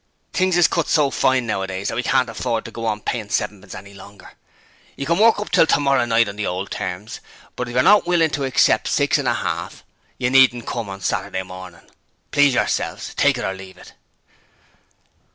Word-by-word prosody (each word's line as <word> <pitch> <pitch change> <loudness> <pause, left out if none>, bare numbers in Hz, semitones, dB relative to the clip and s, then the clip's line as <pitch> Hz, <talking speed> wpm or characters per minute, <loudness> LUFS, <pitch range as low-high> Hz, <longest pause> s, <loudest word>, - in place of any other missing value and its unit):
Things 185 -1 +1
is 175 -3 +5
cut 170 0 -1
so 145 -3 +2
fine 130 -1 +1
nowadays 95 -2 -3
that - - -4
we 125 - 0
can't 125 0 +1
afford 115 0 -3
to - - -8
go 115 -1 -5
on 105 -1 -2
payin' 110 -3 -4
sevenpence 105 -3 -3
any 100 +1 -11
longer. 100 +1 -14 0.6
You 140 - -5
can 170 +4 +1
work 225 +1 +5
up 210 - -6
till - - +4
tomorrow 140 -3 +2
night 115 -1 +2
on 100 0 -7
the 105 - -2
old 90 +2 -4
terms, 95 +5 -5 0.4
but 125 - -4
if 120 - -7
you're 125 - +4
not 205 -3 +5
willin' 165 -3 +2
to 145 - -2
accept 130 - +2
six - - +1
and - - -2
a - - +2
half - - -4 0.3
you 125 0 -1
needn't 130 -3 +4
come 115 -4 -4
on 95 0 -8
Saturday 95 +1 -2
morning. 90 -2 -12 0.4
Please 145 -3 +4
yourselves. - - -2
Take - - +2
it - - -4
or 95 - -2
leave 95 -1 -12
it.' - - -15
115 Hz, 205 wpm, -20 LUFS, 100-140 Hz, 0.6 s, is